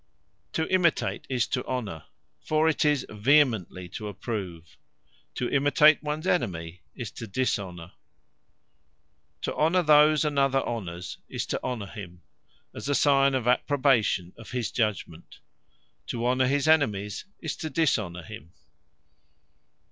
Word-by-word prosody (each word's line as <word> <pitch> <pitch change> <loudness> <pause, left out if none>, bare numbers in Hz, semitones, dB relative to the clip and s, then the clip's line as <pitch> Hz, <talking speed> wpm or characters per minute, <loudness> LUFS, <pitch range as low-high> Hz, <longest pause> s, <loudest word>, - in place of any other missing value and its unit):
To 160 - 0
imitate, 180 -3 +1
is 125 -3 +1
to 125 - -1
Honour; 105 -11 -4 0.4
for 155 +1 +2
it 160 - +2
is 150 -2 +2
vehemently 110 - +2
to 105 +3 -6
approve. 95 -6 -6 0.6
To 125 - -1
imitate 145 +3 +4
ones 150 +2 -4
Enemy, 85 - -1
is 120 -6 -6
to 115 - -8
Dishonour. 95 -6 -2 1.5
To - - -2
honour 170 +4 +2
those 150 0 +5
another 135 -2 +2
honours, 90 -6 -5
is - - -3
to - - -3
Honour 120 -5 -3
him; 90 -4 -10 0.5
as - - -6
a 145 - +2
signe 140 -1 +4
of 125 -2 -1
approbation 125 - +2
of 115 - -11
his 120 -4 -3
judgement. 100 -7 -3 0.7
To 120 0 -3
honour 130 +1 +2
his 145 +3 +1
Enemies, 105 -11 +1
is 160 -4 -4
to 155 - -4
Dishonour 105 - 0
him. 80 +1 -11
125 Hz, 130 wpm, -27 LUFS, 95-145 Hz, 1.5 s, those